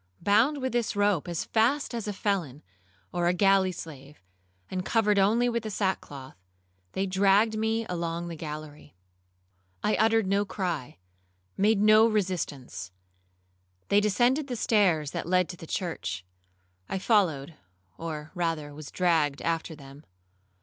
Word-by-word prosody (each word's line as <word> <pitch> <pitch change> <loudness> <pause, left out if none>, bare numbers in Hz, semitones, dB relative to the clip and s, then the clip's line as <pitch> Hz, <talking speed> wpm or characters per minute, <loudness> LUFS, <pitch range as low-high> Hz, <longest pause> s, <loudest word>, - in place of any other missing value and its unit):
Bound 250 +8 +3
with 260 - 0
this 240 -3 -1
rope 205 -5 +1
as 170 -1 -3
fast 245 +6 +1
as 230 -3 -4
a - - -1
felon, 175 -9 -2 0.5
or 175 -1 +1
a 180 - +2
galley 195 -1 +4
slave, 150 -4 -10 0.5
and 185 -1 -3
covered 210 -1 +2
only 225 +5 +3
with 235 -1 0
the 220 - -5
sackcloth, 180 -10 -3 0.6
they 190 - 0
dragged 200 +3 +3
me 220 +1 0
along 170 -1 -3
the 170 - -6
gallery. 150 - -8 0.9
I 210 - +2
uttered 225 -1 +3
no 200 +2 +2
cry, 175 - -4 0.6
made 210 +1 +3
no 215 +1 +6
resistance. 170 - -3 1.0
They 205 +1 +5
descended 245 +7 +2
the 250 - -3
stairs 185 -10 +2
that - - -4
led 180 -1 +3
to 180 - -6
the 165 - -10
church. 95 - -4 0.6
I - - -1
followed, 175 - +1 0.4
or 155 +2 -6
rather 165 -5 -2
was 150 0 -9
dragged 160 -6 +1
after 165 -1 -2
them. 140 0 -13
185 Hz, 145 wpm, -27 LUFS, 160-215 Hz, 1.0 s, no